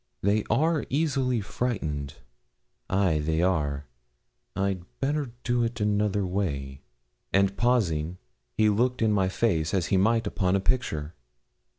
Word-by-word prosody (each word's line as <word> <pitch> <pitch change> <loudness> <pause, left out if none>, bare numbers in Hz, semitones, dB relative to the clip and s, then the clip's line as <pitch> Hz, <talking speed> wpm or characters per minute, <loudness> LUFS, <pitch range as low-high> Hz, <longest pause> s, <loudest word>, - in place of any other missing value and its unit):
'They 105 +2 +2
are 160 +1 +2
easily 135 -4 +1
frightened 80 - -3 0.7
ay, 95 -5 +2
they 80 +2 0
are. 75 -6 0 0.7
I'd 95 -2 -1 0.2
better 145 0 0
do 120 -1 +1
it 115 0 -2
another 105 -1 +1
way.' 70 -8 -3 0.5
And 100 0 +3
pausing, 90 -9 +1 0.4
he 110 - +4
looked 120 +3 +2
in 110 - +3
my 95 -3 +2
face 95 -4 0
as 90 -4 +1
he - - +5
might 115 +4 +3
upon 95 -2 0
a - - +3
picture. 85 -9 -1
100 Hz, 130 wpm, -27 LUFS, 85-115 Hz, 0.7 s, he